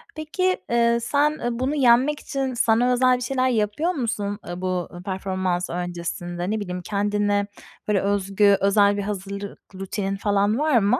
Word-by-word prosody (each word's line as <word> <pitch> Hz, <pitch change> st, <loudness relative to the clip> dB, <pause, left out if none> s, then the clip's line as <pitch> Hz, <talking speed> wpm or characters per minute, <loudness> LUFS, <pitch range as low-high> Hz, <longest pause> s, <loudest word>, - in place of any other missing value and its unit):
Peki, 365 Hz, +4 st, 0 dB
eee, 235 Hz, 0 st, +3 dB
sen, 285 Hz, +5 st, +2 dB
eee, 240 Hz, -, -1 dB
bunu 270 Hz, +4 st, 0 dB
yenmek 265 Hz, +2 st, +4 dB
için 270 Hz, -2 st, -3 dB
sana 240 Hz, +1 st, +3 dB
özel 255 Hz, 0 st, +4 dB
bir 250 Hz, -, -9 dB
şeyler 255 Hz, +1 st, +1 dB
yapıyor 225 Hz, -, 0 dB
musun? 220 Hz, -, -3 dB
Iıı, 175 Hz, +1 st, -6 dB
bu, 185 Hz, -1 st, -1 dB
ııı, 175 Hz, +1 st, -9 dB
performans 185 Hz, -2 st, -2 dB
öncesinde, 175 Hz, +1 st, -4 dB
ne 220 Hz, -, -1 dB
bileyim, 180 Hz, -2 st, -5 dB
kendine, 205 Hz, +1 st, 0 dB, 0.4 s
böyle, 205 Hz, -2 st, +2 dB
özgü 200 Hz, 0 st, +2 dB
özel 200 Hz, +1 st, +4 dB
bir -, -, -1 dB
hazırlık 200 Hz, 0 st, -5 dB, 0.2 s
rutinin 195 Hz, +1 st, -3 dB
falan 205 Hz, +3 st, +1 dB
var 300 Hz, -4 st, +3 dB
mı? 200 Hz, -1 st, +2 dB
205 Hz, 165 wpm, -23 LUFS, 195-245 Hz, 0.4 s, yenmek